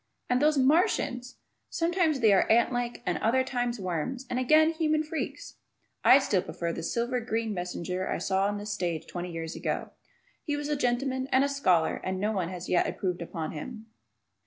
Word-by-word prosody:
And 250 +1 +3
those 300 0 +3
Martians! 260 -3 +2 0.3
Sometimes 335 -4 +1
they 220 -3 +6
are 195 - +3
ant 235 +2 +4
like, 245 0 -3
and 175 -3 0
other 260 +4 +2
times 245 -2 -2
worms, 185 - -3
and 250 - 0
again 310 +5 +5
human 310 -1 +1
freaks! 315 +1 -5 0.5
(I 260 - +8
still 210 -9 +1
prefer 170 -1 -4
the 165 - -5
silver 240 +8 -1
green 225 -2 -2
messenger 180 0 -3
I - - 0
saw 195 0 +1
on 205 0 -2
the 205 - -6
stage 175 -6 -2
twenty 175 0 -6
years 165 0 -5
ago. - - -3 0.5
He 295 - -1
was 290 0 -4
a 295 - +1
gentleman 260 0 0
and 260 +1 +4
a - - +2
scholar 185 - +2
and 185 0 -2
no 210 +2 0
one 190 -5 -1
yet 180 -1 0
has - - -3
improved 180 -2 -2
upon 165 -1 -4
him.) 220 +7 -8
235 Hz, 190 wpm, -28 LUFS, 180-265 Hz, 0.5 s, I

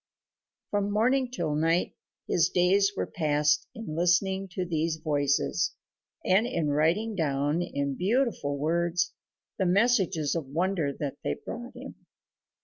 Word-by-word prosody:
From 205 -1 0
morning 250 +5 +2
till 170 -11 -2
night 165 +3 +1 0.3
his 165 -3 +2
days 195 +3 +3
were - - 0
passed 150 -2 +1
in 220 -9 -6
listening 190 +3 +2
to 185 0 -2
these 165 -1 -1
voices, 145 - 0 0.5
and 200 +5 +3
in 170 -11 -1
writing 165 +10 +1
down 145 -1 0
in 140 -5 -2
beautiful 195 - 0
words 170 +3 0 0.5
the 190 - +2
messages 190 - +2
of 165 -5 -3
wonder 165 0 0
they 140 0 -4
brought 240 +1 -7
him. - - -10
170 Hz, 130 wpm, -28 LUFS, 150-195 Hz, 0.5 s, days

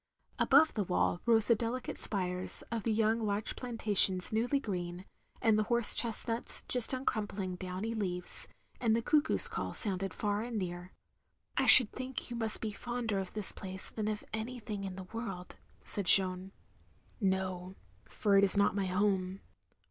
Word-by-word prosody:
Above 300 +3 +4
the 210 - -1
wall 180 -1 -1
rose 225 -2 +4
the - - +5
delicate 235 +3 -4
spires 180 -2 +2
of 230 -1 -2
the 225 - -1
young 220 +1 +1
larch 205 0 -2
plantations 210 -6 0
newly 245 +6 +1
green; 180 -5 -5 0.4
and 215 -2 +3
horse 235 +1 +2
chestnuts 230 0 0
just 250 -3 +3
uncrumpling 205 -7 -3
downy 185 +5 -5
leaves; 180 -5 0 0.3
the 230 -1 +1
cuckoo's 300 +4 +3
call - - -5
sounded 195 -3 0
far 205 -1 -2
and 235 0 -5
near. 180 -1 -5 0.6
"I - - +1
should 245 -5 +10
think 255 -1 -5
you - - -4
must 225 -2 -1
be 220 - -3
fonder 235 -2 -4
of 190 -1 -6
this 210 -2 -1
place 190 -1 -6
than 215 -1 -4
of 215 -1 -3
anything 220 -3 -5
in 190 -1 -6
the 190 - -8
world, 195 -3 -7
" - - -32
said 200 -3 -4
Jeanne. 185 0 +4 0.7
"No; 190 -2 -2 0.3
for 205 -2 0
it - - +3
is 200 +1 +1
not 200 0 +3
my 195 -1 -2
home. 190 0 -1
210 Hz, 165 wpm, -31 LUFS, 190-230 Hz, 0.7 s, should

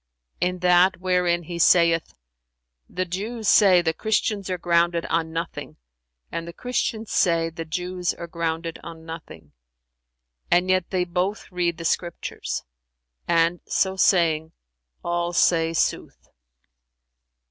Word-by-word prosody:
"In 180 0 0
that 180 +1 +4
wherein 180 -2 +1
He 170 +1 -6
saith, 170 -1 +4 0.7
'The 185 +1 -2
Jews 210 +5 -4
say, 185 -5 +6
'The 160 -1 +1
Christians 210 0 -1
are 185 - -1
grounded 170 -1 +1
on 165 0 0
nothing,' 165 +1 -5 0.5
and 165 0 -4
the 170 - -8
Christians 230 -2 -3
say, 165 -2 +2
'The 165 0 -6
Jews 180 +2 -2
are 170 - -7
grounded 165 0 -3
on 165 -1 -10
nothing'; 155 - -10 1.0
and 180 +1 +3
yet 185 -2 +1
they 185 -2 0
both 180 +5 -2
read 175 -2 -1
the 165 - -7
Scriptures;'[FN#359] 170 +1 -3 0.6
and, 170 +1 +2
so 190 -1 +1
saying, 165 -4 +2 0.5
all 175 0 -1
say 165 -2 +3
sooth." 165 - -2
175 Hz, 125 wpm, -24 LUFS, 165-185 Hz, 1.0 s, say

